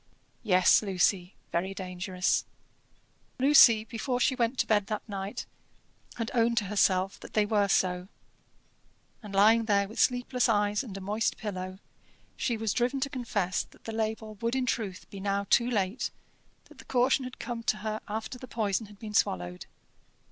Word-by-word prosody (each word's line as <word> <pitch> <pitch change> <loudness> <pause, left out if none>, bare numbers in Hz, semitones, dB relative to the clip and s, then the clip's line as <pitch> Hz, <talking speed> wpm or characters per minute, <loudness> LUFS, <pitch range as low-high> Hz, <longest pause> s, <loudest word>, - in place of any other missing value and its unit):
Yes, 185 -5 +5
Lucy, 190 -2 0 0.2
very 190 +3 -1
dangerous. 185 -1 -1 0.9
Lucy, 260 -5 +7
before 240 +3 -3
she 260 - +3
went 245 0 0
to - - +2
bed 210 -2 +2
that 215 0 -4
night, 195 -1 -5 0.7
had 230 -2 -3
owned 235 -1 +2
to 225 - +3
herself 195 -1 +1
that - - -12
they 210 -1 +3
were 205 -1 +2
so; 180 -1 +1 1.1
and 205 -3 -8
lying 220 +3 +5
there 200 -2 +2
with 220 - -8
sleepless 250 0 +2
eyes 205 +1 +2
and 205 -7 -8
a - - -7
moist 210 +4 -1
pillow, 185 -3 -5 0.6
she 235 - -1
was 220 -2 -1
driven 250 +3 0
to 275 - -1
confess 210 -8 -1
that - - -16
the 225 - -6
label 220 0 -3
would 230 +2 0
in 260 -1 0
truth 210 -6 -3
be 200 - -8
now 200 0 -1
too 240 0 +4
late, 205 -1 -1 0.6
that 305 -4 -18
the 260 - -12
caution 260 +2 +2
had 255 0 -8
come 240 -2 -5
to 220 - 0
her 215 0 -2
after 220 +4 -5
the 255 - -9
poison 220 -2 -1
had 205 0 -15
been 210 0 -8
swallowed. 90 - 0
215 Hz, 170 wpm, -29 LUFS, 195-235 Hz, 1.1 s, Lucy